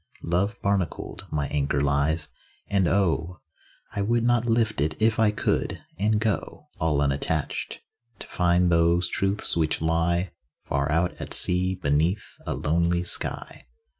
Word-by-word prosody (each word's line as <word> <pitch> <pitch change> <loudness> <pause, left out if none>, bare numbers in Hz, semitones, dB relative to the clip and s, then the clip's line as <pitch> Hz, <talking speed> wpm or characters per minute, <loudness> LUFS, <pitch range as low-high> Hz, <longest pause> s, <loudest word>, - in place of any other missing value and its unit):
Love 100 +7 -1
barnacled, 100 -5 -2
my 70 -2 -1
anchor 70 -1 0
lies; 70 +3 0 0.4
and 95 -3 +1
oh! 90 -3 0 0.5
I 100 - -3
would 115 +3 +1
not 120 0 +2
lift 115 -7 +1
it 75 +1 -1
if 110 0 +2
I 110 -1 +5
could, 105 - -1 0.2
and 105 +1 +2
go 110 -2 -3
All 75 -3 +1
unattached, 70 +2 -2 0.4
to - - -7
find 90 0 +2
those 85 +1 +3
truths 95 +3 +1
which 80 -2 +1
lie 85 +3 0 0.3
Far 70 +2 -1
out 85 +3 +1
at - - +3
sea, 90 +1 +2
beneath 85 +4 0 0.2
a - - -1
lonely 85 +3 +1
sky. 90 - -3
85 Hz, 140 wpm, -25 LUFS, 80-100 Hz, 0.5 s, I